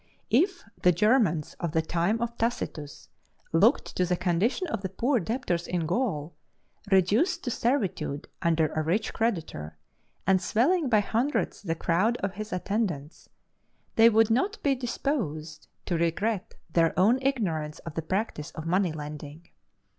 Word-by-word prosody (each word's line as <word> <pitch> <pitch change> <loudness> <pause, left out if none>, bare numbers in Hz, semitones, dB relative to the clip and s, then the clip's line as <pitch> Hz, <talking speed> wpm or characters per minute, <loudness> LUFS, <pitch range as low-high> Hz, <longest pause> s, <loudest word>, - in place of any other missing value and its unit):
If 345 - +2 0.2
the 180 - +6
Germans 205 - +2
of 170 -2 -3
the 160 - +3
time 175 +8 0
of 235 0 -4
Tacitus 160 -11 -3 0.5
looked 205 - +3
to 185 - +3
the 180 0 +1
condition 185 - +1
of 310 - -3
the 190 - -3
poor 240 +7 +1
debtors 180 -4 -2
in 175 -2 -1
Gaul, 170 - -1 0.6
reduced 220 - +3
to 245 - -2
servitude 195 - -1
under 165 -2 +2
a 155 - 0
rich 180 +8 0
creditor, 165 - -2 0.5
and 190 0 +3
swelling 290 - +2
by 215 -3 +4
hundreds 240 +8 -1
the 165 -5 -2
crowd 190 +9 +1
of 195 -1 -1
his 215 +2 -6
attendants, 180 -6 -3 0.7
they 225 +1 +7
would 225 0 +4
not 385 - +1
be 280 - +3
disposed 180 - -3 0.2
to 170 -3 -1
regret 185 +5 -1 0.2
their 165 -2 +3
own 225 +8 +5
ignorance 175 - -1
of 165 - -6
the 165 - -2
practice 170 -3 -2
of 155 - -6
money 180 +1 +2
lending. 150 +1 -8
190 Hz, 150 wpm, -27 LUFS, 165-235 Hz, 0.7 s, they